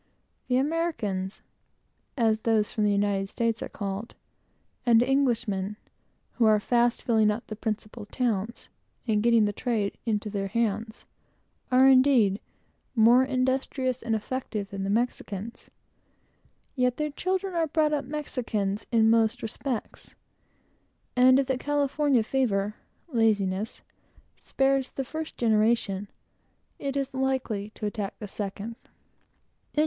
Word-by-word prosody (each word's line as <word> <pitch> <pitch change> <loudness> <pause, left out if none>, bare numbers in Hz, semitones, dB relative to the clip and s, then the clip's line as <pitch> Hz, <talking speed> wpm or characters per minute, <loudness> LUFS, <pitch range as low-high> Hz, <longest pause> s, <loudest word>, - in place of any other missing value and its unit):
The 250 - +2
Americans 255 - -1 0.7
(as 220 -3 +2
those 220 -2 +1
from 215 -3 0
the 205 - +3
United 200 -1 0
States 230 0 -1
are - - -4
called) 200 +2 -5 0.7
and 235 -1 +5
Englishmen, 230 -7 0 0.5
who 235 - +1
are 215 -1 +5
fast 240 +2 +1
filling 220 -3 +3
up 215 +3 -2
the 215 - -6
principal 215 0 -4
towns, 230 -2 -2 0.4
and 210 -2 +2
getting 230 -1 +4
the 205 - -1
trade 220 -4 -2
into 210 -1 0
their 200 -1 -2
hands, 220 +1 -2 0.7
are 255 +1 +6
indeed 255 -7 +5 0.6
more 235 +3 +6
industrious 260 0 -1
and 225 -1 0
effective 215 -2 -4
than 195 0 -2
the 235 +4 +3
Spaniards; 205 +4 -8 1.1
yet 250 -2 +1
their 300 -1 -1
children 375 +4 -2
are 330 -2 +1
brought 305 0 +1
up 285 -2 -1
Spaniards, 230 -8 -3
in 225 -1 +5
every 225 -1 +4
respect, 235 +1 -5 1.0
and 255 +1 +6
if 275 - +2
the 260 -1 -1
"California 285 -3 +1
fever" 215 -5 0 0.4
(laziness) 210 -3 +1 0.6
spares 270 -1 +1
the 270 - -4
first 315 +3 -6
generation, 215 -3 +2 0.7
it 280 0 -3
always 260 -6 -1
attacks 210 -1 -3
the 210 - -7
second. 205 +3 -5
230 Hz, 125 wpm, -27 LUFS, 210-260 Hz, 1.1 s, are